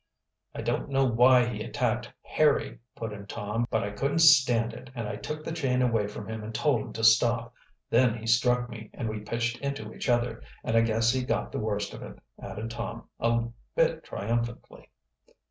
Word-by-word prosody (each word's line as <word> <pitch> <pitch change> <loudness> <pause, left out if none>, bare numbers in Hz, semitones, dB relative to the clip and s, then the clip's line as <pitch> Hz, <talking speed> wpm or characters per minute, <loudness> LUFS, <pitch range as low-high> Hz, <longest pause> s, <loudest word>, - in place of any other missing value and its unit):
"I - - -4
don't - - -1
know 135 0 +3
why 125 +1 +5
he 110 -3 -4
attacked 120 -1 -1
Harry," 155 -1 +1 0.2
put 115 -2 -5
in 100 -1 -9
Tom. 105 +4 -2
"But 110 - 0
I 100 - -3
couldn't 135 +9 -1
stand 125 -7 +5
it, 125 +1 -10
and 115 -3 -3
I 105 - -4
took 150 +8 -6
the - - -4
chain 130 -6 +1
away 115 -4 +1
from 105 0 -8
him 110 -1 -5
and 110 +1 -7
told 135 -2 +2
him - - -8
to 115 - -5
stop. 115 +1 +4 0.4
Then 120 -1 +4
he 115 - -9
struck 125 +1 +3
me, 110 -2 -9
and 115 - -3
we 110 0 -4
pitched 115 +2 -2
into 135 -6 -4
each - - -4
other 120 -1 +1 0.2
and 110 - -1
I 115 - +6
guess 115 +1 +2
he 130 -1 0
got - - -1
the - - -3
worst 105 -2 -2
of - - -9
it," - - -9 0.2
added 105 +4 -6
Tom, 115 0 -6
a 115 0 +1 0.3
bit - - +2
triumphantly. 115 +3 -4
115 Hz, 200 wpm, -28 LUFS, 110-125 Hz, 0.4 s, I